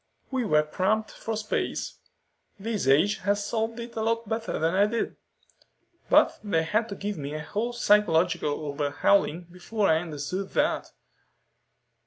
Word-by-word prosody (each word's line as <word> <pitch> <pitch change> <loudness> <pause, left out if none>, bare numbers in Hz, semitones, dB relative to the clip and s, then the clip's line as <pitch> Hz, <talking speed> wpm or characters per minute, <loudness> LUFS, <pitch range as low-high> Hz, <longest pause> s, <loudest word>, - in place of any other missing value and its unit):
"We 260 -3 0
were 150 -6 +4
cramped 195 +8 0
for 225 -1 -4
space. 215 0 -3 0.6
This 210 - -2
age 155 +10 +4
has 205 +1 0
solved 225 +2 -2
it 235 0 -7
a 220 - -2
lot 230 0 0
better 225 +1 -2
than 165 +2 +1
I 200 +2 +4
did. 230 +1 -2 0.9
But - - +5
they 165 -6 +1
had 215 +7 0
to 200 - -5
give 205 -2 -4
me 145 +1 -5
a 155 - -4
whole 215 +9 -2
psychological 175 -8 +2
overhauling 150 +5 +1
before 200 +3 -1
I 160 0 +4
understood 170 +4 -4
that." - - +1
200 Hz, 150 wpm, -27 LUFS, 160-220 Hz, 0.9 s, But